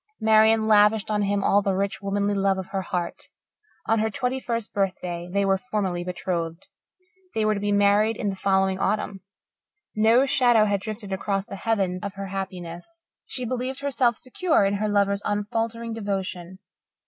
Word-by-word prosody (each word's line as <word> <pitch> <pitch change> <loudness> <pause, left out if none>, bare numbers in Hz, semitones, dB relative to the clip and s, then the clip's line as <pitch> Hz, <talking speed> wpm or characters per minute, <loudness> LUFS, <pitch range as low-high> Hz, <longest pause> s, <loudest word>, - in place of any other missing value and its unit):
Marian 220 0 +4
lavished 210 0 +4
on 210 -1 +1
him 200 0 0
all 200 +1 +4
the 195 -1 0
rich, 200 +2 -2
womanly 200 +1 0
love 195 -1 +1
of 190 -1 -6
her 195 -1 -2
heart. 175 -2 -4 0.6
On 225 0 +2
her 220 +1 +1
twenty 250 +5 -2
first 230 -3 -3
birthday 180 -3 -2
they 200 +1 +1
were 195 -1 +2
formally 195 -7 -2
betrothed. 175 -2 -3 0.7
They 220 -1 +1
were 215 - +3
to 205 - -3
be 205 0 -1
married 205 +2 +3
in 205 -4 -1
the - - -6
following 190 -1 +1
autumn. 200 -1 -1 0.7
No 225 +5 +4
shadow 245 -5 +4
had 200 -2 0
drifted 210 -2 -6
across 195 0 -1
the - - -8
heaven 195 -4 -1
of 200 -1 -5
her 195 0 -6
happiness. 190 - -7 0.2
She 255 - -4
believed 255 +2 -3
herself 260 -4 +1
secure 265 - +1
in 200 +1 +1
her 215 +1 -1
lover's 200 -1 +2
unfaltering 225 +3 -2
devotion. 190 -4 -4
205 Hz, 170 wpm, -25 LUFS, 195-220 Hz, 0.7 s, Marian